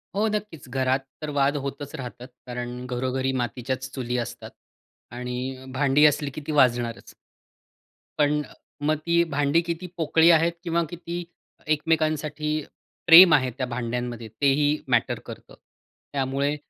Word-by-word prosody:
हो, 215 +2 +2
नक्कीच 200 -11 -5
घरात 130 +1 +1 0.2
तर, 155 - -4
वाद 140 +1 +3
होतच 140 +2 -6
राहतात, 125 -2 -8 0.2
कारण 125 0 -5
"घरोघरी 130 +1 -1
मातीच्याच 130 +2 -4
चुली" 125 -2 -3
असतात - - -9 0.6
आणि 125 +1 -5
भांडी 140 +2 +4
असली 145 -1 +2
की 155 - -5
ती - - -1
वाजणारच. 120 -5 +1 1.0
पण, 150 0 +2 0.4
मग 155 +1 +1
ती 170 0 +3
भांडी 145 0 +1
किती 170 +1 -4
पोकळी 160 +1 +4
आहेत? 165 +1 +4
किंवा 170 0 0
किती 175 0 -6 0.4
एकमेकांसाठी, 155 -1 0 0.5
प्रेम 170 0 +10
आहे 130 -3 +3
त्या 130 - -1
भांड्यांमध्ये? 120 -1 -4
तेही 145 +2 +3
मॅटर 120 -3 +1
करतं. - - -11 0.6
त्यामुळे 140 +2 0
140 Hz, 130 wpm, -25 LUFS, 125-155 Hz, 1.0 s, प्रेम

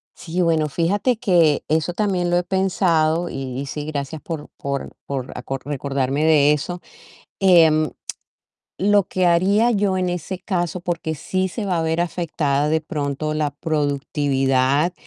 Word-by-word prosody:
Sí, 175 +2 -3
bueno, 160 -3 +2
fíjate 200 - +1
que 175 - +3
eso 160 +3 0
también 185 -3 0
lo 175 - +2
he 175 - +1
pensado, 175 -3 +1
y 135 0 -5
sí, 145 +1 -5
gracias 150 0 -4
por 160 -3 -6
por 140 -1 -4 0.2
por 130 -2 -4
aco 135 +2 -4
recordarme 140 0 -1
de 150 -2 +5
eso. 175 +4 -4 0.6
Em, 160 -5 +5 0.9
lo 205 +1 +3
que 185 0 0
haría 195 +7 +3
yo 195 -2 +1
en 185 -1 0
ese 180 +1 -4
caso, 180 -2 -2
porque 170 -2 -3
sí 185 +5 -1
se 205 +2 -5
va 180 -3 0
a - - 0
ver 160 +1 0
afectada 150 -4 0
de 160 0 +2
pronto 150 0 -3
la 150 -1 0
productividad 145 -1 0
160 Hz, 150 wpm, -21 LUFS, 145-180 Hz, 0.9 s, de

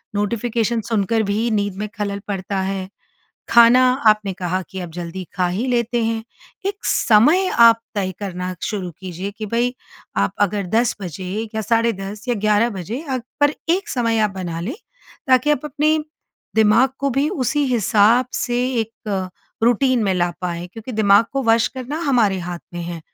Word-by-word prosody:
Notification 230 +2 0
सुनकर 220 0 +1
भी 225 +3 0
नींद 205 -2 0
में 210 0 -3
खलल 200 -1 -2
पड़ता 195 -1 -2
है। 190 0 -3 0.6
खाना 235 +2 +7 0.3
आपने 210 -2 +3
कहा 185 0 -2
कि 190 - -7
अब 175 - -6
जल्दी 175 +2 -6
खा 180 -1 +1
ही 200 +8 -2
लेते 240 -1 0
हैं। 225 0 -1 0.4
एक 405 +3 -4
समय 295 - +4
आप 230 -1 +7
तय 190 -2 -1
करना 185 -2 -4
शुरू 195 -5 -3
कीजिए 185 +1 -5
कि 215 - -4
भई, 240 +3 0 0.4
आप 100 0 +1
अगर 205 -1 +1
10 225 +5 +1
बजे 180 0 -6 0.3
या 220 - -1
10:30 215 -2 -1
या 245 - +2
11 215 +2 +2
बजे 205 - -5
अ 260 - +1 0.2
पर 290 0 +4 0.2
एक 385 +4 +1
समय 230 -3 +1
आप 210 - -6
बना 170 -3 -4
लें 230 - -4 0.5
ताकि 255 +3 +4
आप 295 -1 +1
अपने, 300 +2 +1 0.6
दिमाग 220 +4 +5
को 280 0 +1
भी 275 +4 +1
उसी 290 - 0
हिसाब 225 +2 +4
से 240 -1 -1 0.2
एक 205 -4 -4 0.4
रूटीन 245 +1 +3
में 195 - +2
ला 175 -1 +1
पाएँ 175 -1 -3
क्योंकि 225 +3 -8
दिमाग 210 0 +5
को 275 - -1
वश 225 0 +4
करना 260 +5 -4
हमारे 215 -7 +3
हाथ 175 0 -5
में 175 - -4
है। 170 -1 -6
215 Hz, 170 wpm, -20 LUFS, 190-240 Hz, 0.6 s, खाना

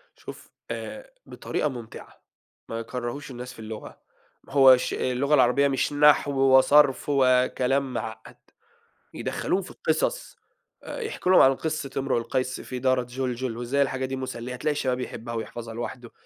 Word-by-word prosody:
شوف - - -11 0.2
آآ، - - -7 0.2
بطريقة 150 - -3
ممتعة، 120 -4 -10 0.5
ما 115 - -4
يكرّهوش 125 +4 -5
الناس 125 0 -8
في 125 - -16
اللغة، 110 -1 -9 0.5
هو 135 -2 +7
ش - - -3
اللغة 130 +3 0
العربية 130 +1 +4
مش 135 +1 0
نحو 145 0 +5
وصرف 135 +1 +5
وكلام 130 0 +2
معقّد، 110 0 -6 0.8
يدخّلوهم 195 - -2
في - - -10
القِصَص 160 - -2 0.5
آآ، - - -6
يحكوا 435 - -2
لهم 185 - +7
عن 135 0 +6
قصّة 155 -1 -3
امرؤ 135 -2 0
القيس 130 +2 -2
في 125 - -6
دارة 130 0 +2
جُلجُل، 125 -1 -4
وإزاي 120 +4 0
الحاجة 130 -1 0
دي 130 +1 -4
مسلية، 125 -2 -5
هتلاقي 140 +5 -1
الشباب 130 -3 -1
يحبّها 115 -1 -6
ويحفظها 115 0 -6
لوحدُه، 120 +1 -6
130 Hz, 150 wpm, -25 LUFS, 120-140 Hz, 0.8 s, هو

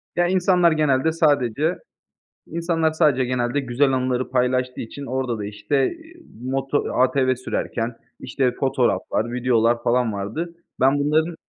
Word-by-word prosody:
Ya, 175 0 +2
insanlar 180 -2 +3
genelde 155 -1 +2
sadece 150 -1 +1 0.7
insanlar 165 -1 0
sadece 150 -5 +2
genelde 125 +2 -1
güzel 135 +1 +1
anıları 130 0 -1
paylaştığı 125 0 0
için 140 +5 -8
orada 130 -2 -2
da, 100 - -4
işte, 135 +6 -1
iii, 330 0 -16 0.3
moto 135 +2 -1
ATV 130 0 +2
sürerken, 120 -2 -3 0.2
işte, 125 0 0
fotoğraflar, 125 -3 0
videolar 120 -1 +1
falan 120 -2 +1
vardı. 135 - -4 0.2
Ben 135 +2 +3
bunların 155 +3 +1
130 Hz, 130 wpm, -22 LUFS, 125-155 Hz, 0.7 s, insanlar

